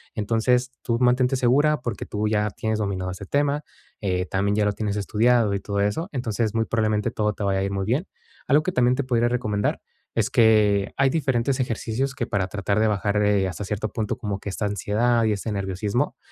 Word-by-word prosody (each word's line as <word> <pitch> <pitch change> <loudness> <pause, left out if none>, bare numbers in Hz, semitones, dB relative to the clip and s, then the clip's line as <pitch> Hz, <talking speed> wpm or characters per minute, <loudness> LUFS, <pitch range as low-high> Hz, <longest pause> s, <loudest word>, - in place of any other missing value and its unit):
Entonces, 120 +4 +1
tú 115 0 0
mantente 125 +1 +3
segura 140 +4 +3
porque 115 -5 -4
tú 105 +1 -2
ya 105 0 +1
tienes 110 +1 -2
dominado 95 -3 -2
ese 95 +2 -8
tema, 145 +5 0 0.4
eh, 90 -3 0
también 100 +2 0
ya 105 - +2
lo 105 - +1
tienes 105 -1 -2
estudiado 110 +2 +2
y - - -1
todo 100 0 -3
eso. 130 - -1
Entonces, 115 -4 -1
muy 110 - +1
probablemente 110 -2 0
todo 105 -1 0
te 105 - -6
vaya 95 -1 +1
a - - 0
ir 100 - -2
muy 100 -1 -2
bien. 130 - 0 0.4
Algo 150 +3 +4
que 185 - -2
también 125 0 +3
te 140 - -1
podría 120 -2 +2
recomendar, 110 -4 -1 0.4
es - - +1
que 105 -3 +3
hay 135 0 +4
diferentes 130 -3 0
ejercicios 125 +2 -2
que - - -3
para 95 -2 0
tratar 100 +1 -1
de 110 - +3
bajar, 105 0 +1
eh, 100 -2 +2
hasta 95 +2 -5
cierto 105 +1 -2
punto 110 -4 -3
como 100 -2 -4
que 100 - -6
esta 105 - -3
ansiedad 110 +4 +1
y 110 - +2
este 105 +2 -4
nerviosismo, 100 +6 -2
110 Hz, 210 wpm, -24 LUFS, 100-125 Hz, 0.4 s, Algo